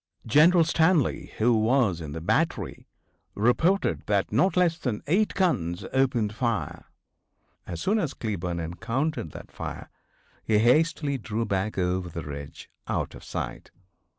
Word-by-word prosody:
General 165 Hz, +8 st, +6 dB
Stanley, 160 Hz, -2 st, +2 dB
who 115 Hz, +2 st, +3 dB
was 110 Hz, -5 st, +2 dB
in 75 Hz, -2 st, -6 dB
the 80 Hz, +2 st, -5 dB
battery, 85 Hz, -, -1 dB, 0.5 s
reported 160 Hz, -, +2 dB
that 100 Hz, -2 st, +1 dB
not 145 Hz, -, +2 dB
less 175 Hz, -2 st, +3 dB
than 120 Hz, -6 st, -3 dB
eight 195 Hz, +8 st, +1 dB
guns 90 Hz, -, 0 dB
opened 125 Hz, -6 st, +1 dB
fire. 110 Hz, -, -2 dB, 0.8 s
As 85 Hz, -, -5 dB
soon 215 Hz, +3 st, +2 dB
as 150 Hz, -9 st, -2 dB
Cleburne 90 Hz, -6 st, -3 dB
encountered 115 Hz, -, -2 dB
that -, -, -10 dB
fire -, -, -7 dB, 0.5 s
he 110 Hz, -, +2 dB
hastily 140 Hz, +4 st, +2 dB
drew 115 Hz, 0 st, -2 dB
back 100 Hz, +1 st, -2 dB
over 90 Hz, -1 st, 0 dB
the 85 Hz, 0 st, -6 dB
ridge, 70 Hz, -1 st, -8 dB, 0.2 s
out -, -, -2 dB
of -, -, -12 dB
sight. -, -, -5 dB
115 Hz, 140 wpm, -26 LUFS, 95-155 Hz, 0.8 s, General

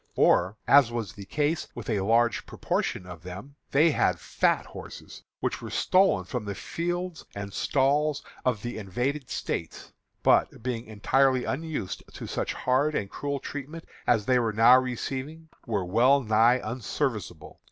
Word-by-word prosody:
Or, 95 Hz, +5 st, +3 dB
as 140 Hz, -4 st, +6 dB
was 115 Hz, -5 st, -4 dB
the 100 Hz, -, -10 dB
case 150 Hz, -, -1 dB
with -, -, -7 dB
a 110 Hz, -4 st, 0 dB
large 115 Hz, +4 st, +2 dB
proportion 90 Hz, -, -2 dB
of 90 Hz, -3 st, -10 dB
them, 95 Hz, -, -9 dB
they 155 Hz, +4 st, +4 dB
had -, -, +1 dB
fat -, -, +1 dB
horses, -, -, -10 dB, 0.2 s
which -, -, -2 dB
were -, -, -6 dB
stolen 185 Hz, -, +3 dB
from 120 Hz, +4 st, -4 dB
the 100 Hz, -1 st, -5 dB
fields 175 Hz, -, -4 dB
and 100 Hz, -1 st, -6 dB
stalls 145 Hz, +2 st, +1 dB, 0.2 s
of 120 Hz, -5 st, 0 dB
the 120 Hz, -1 st, -4 dB
invaded 125 Hz, +8 st, -2 dB
States, 80 Hz, -, -4 dB, 0.3 s
but, -, -, +3 dB
being 120 Hz, -3 st, -3 dB
entirely 130 Hz, +4 st, +2 dB
unused 145 Hz, -, -3 dB
to -, -, -7 dB
such -, -, -2 dB
hard 140 Hz, +4 st, +1 dB
and 100 Hz, -, -2 dB
cruel 140 Hz, -1 st, -3 dB
treatment 145 Hz, +5 st, -7 dB, 0.2 s
as 110 Hz, -4 st, +3 dB
they 125 Hz, 0 st, +3 dB
were 115 Hz, -2 st, 0 dB
now 115 Hz, +4 st, +7 dB
receiving, 135 Hz, +5 st, -5 dB, 0.2 s
were 105 Hz, -5 st, -1 dB
well 125 Hz, +9 st, +4 dB
nigh 115 Hz, +3 st, +4 dB
unserviceable. 110 Hz, -, -4 dB
125 Hz, 155 wpm, -27 LUFS, 105-140 Hz, 0.3 s, now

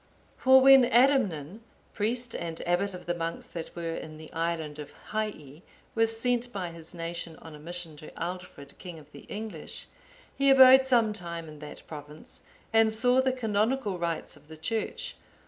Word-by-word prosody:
For 265 Hz, 0 st, +6 dB
when 270 Hz, 0 st, +9 dB
Adamnan,(854) 235 Hz, -, +3 dB, 0.3 s
priest 235 Hz, +3 st, -1 dB
and 165 Hz, -1 st, -4 dB
abbot 180 Hz, +2 st, +1 dB
of 180 Hz, -, -10 dB
the 175 Hz, -, 0 dB
monks 165 Hz, -1 st, -4 dB
that 165 Hz, -2 st, -7 dB
were 165 Hz, -1 st, -3 dB
in 155 Hz, -1 st, -7 dB
the 155 Hz, 0 st, -12 dB
island 165 Hz, -2 st, -2 dB
of 145 Hz, -1 st, -8 dB, 0.2 s
Hii, 175 Hz, -9 st, -4 dB, 0.3 s
was 225 Hz, 0 st, +1 dB
sent 245 Hz, 0 st, 0 dB
by 185 Hz, -5 st, -4 dB
his 165 Hz, +1 st, -10 dB
nation 170 Hz, -1 st, -5 dB
on 160 Hz, 0 st, -12 dB
a 150 Hz, -, -11 dB
mission 170 Hz, 0 st, -7 dB
to 155 Hz, -, -10 dB
Aldfrid, 175 Hz, -5 st, -7 dB
king 175 Hz, -3 st, -8 dB
of 150 Hz, -1 st, -15 dB
the -, -, -13 dB
English,(855) 215 Hz, 0 st, -6 dB, 0.5 s
he 275 Hz, 0 st, +4 dB
abode 265 Hz, 0 st, +8 dB
some 230 Hz, -4 st, +4 dB
time 170 Hz, -4 st, -5 dB
in 150 Hz, -1 st, -11 dB
that 150 Hz, 0 st, -10 dB
province, 150 Hz, 0 st, -10 dB, 0.3 s
and 225 Hz, 0 st, +5 dB
saw 245 Hz, +4 st, +4 dB
the 260 Hz, 0 st, +2 dB
canonical 220 Hz, -3 st, 0 dB
rites 170 Hz, -1 st, -2 dB
of -, -, -19 dB
the 160 Hz, 0 st, -11 dB
Church. 220 Hz, +8 st, -3 dB
180 Hz, 175 wpm, -28 LUFS, 160-230 Hz, 0.5 s, when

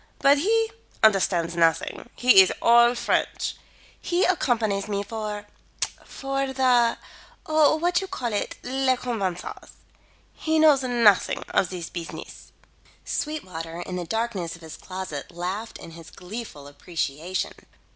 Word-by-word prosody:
But 280 Hz, +1 st, +5 dB
he 445 Hz, +6 st, +2 dB, 0.3 s
understands 180 Hz, -5 st, +3 dB
nothing. 165 Hz, +7 st, +1 dB
He 245 Hz, -6 st, +7 dB
is 190 Hz, -, +3 dB
all 235 Hz, +1 st, +6 dB
French. -, -, -1 dB, 0.5 s
He 355 Hz, +1 st, +1 dB
accompanies 225 Hz, -, +1 dB
me 200 Hz, -1 st, -2 dB
for 210 Hz, -1 st, -5 dB, 0.6 s
for 275 Hz, 0 st, -3 dB
the 250 Hz, -3 st, +3 dB, 0.5 s
what 315 Hz, +3 st, +3 dB
you 385 Hz, -, -5 dB
call 240 Hz, -, -3 dB
it? 205 Hz, -, -2 dB
les 260 Hz, 0 st, +1 dB
convenances. 200 Hz, -8 st, -4 dB, 0.6 s
He 315 Hz, 0 st, -1 dB
knows 305 Hz, -3 st, +6 dB
nothing 235 Hz, -6 st, +3 dB
of 185 Hz, -, +1 dB
the 185 Hz, -, -5 dB, 0.2 s
beesiness." 170 Hz, -2 st, -8 dB, 0.5 s
Sweetwater 170 Hz, -, -4 dB
in 180 Hz, +1 st, -5 dB
the 180 Hz, -, -3 dB
darkness 215 Hz, -5 st, -2 dB
of 165 Hz, -, -16 dB
his 160 Hz, -, -8 dB
closet 185 Hz, -6 st, -6 dB
laughed 185 Hz, +6 st, -5 dB
in 165 Hz, -, -11 dB
his 165 Hz, -1 st, -12 dB
gleeful 185 Hz, -6 st, -8 dB
appreciation. 160 Hz, +3 st, -3 dB
215 Hz, 125 wpm, -25 LUFS, 180-260 Hz, 0.6 s, He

